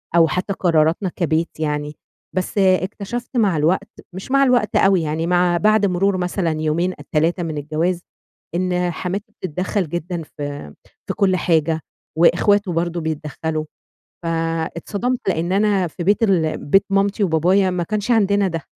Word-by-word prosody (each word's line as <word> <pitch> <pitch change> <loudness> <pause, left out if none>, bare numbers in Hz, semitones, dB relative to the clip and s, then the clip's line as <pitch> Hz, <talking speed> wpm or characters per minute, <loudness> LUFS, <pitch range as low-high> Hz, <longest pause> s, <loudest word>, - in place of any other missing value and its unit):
أو 165 -1 +6
حتى 180 +4 -2
قراراتنا 165 +1 +2
كبيت 165 -2 -1
يعني، 150 -1 -2 0.4
بس 185 +3 -2
اكتشفت 200 +6 0
مع 200 -8 +3
الوقت، 160 +5 +1 0.2
مش 190 +7 -8
مع 275 0 +5
الوقت 250 -5 +2
أوي 195 -2 +4
يعني 160 +1 -2
مع 175 0 +3
بعد 215 +2 +3
مرور 190 +1 +1
مثلًا 180 -1 -1
يومين 165 +4 0
أ - - -9
3 165 +3 +1
من 160 -2 -4
الجواز، 160 +5 -1 0.5
إن 180 0 0
حماتي 200 +6 -4
بتتدخّل 185 +1 -2
جدًا 175 +1 -4
في 145 - -7 0.3
في - - -3
كُلّ 190 -2 +2
حاجة 160 -2 +1 0.4
وإخواته 190 +4 +3
برضه 170 +1 -1
بيتدخّلوا، 155 0 -3 0.6
فاتصدمت 165 +8 -2
لإن 170 0 -1
أنا 200 -2 +2
في 170 +2 -7
بيت 205 +5 +2
ال 175 -7 +2
بيت 195 +7 +4
مامتي 200 +1 +1
وبابايا 185 +3 +3
ما 180 -1 -1
كانش 210 +5 -2
عندنا 200 -3 +3
ده. 165 -3 -3
180 Hz, 150 wpm, -20 LUFS, 160-195 Hz, 0.6 s, أو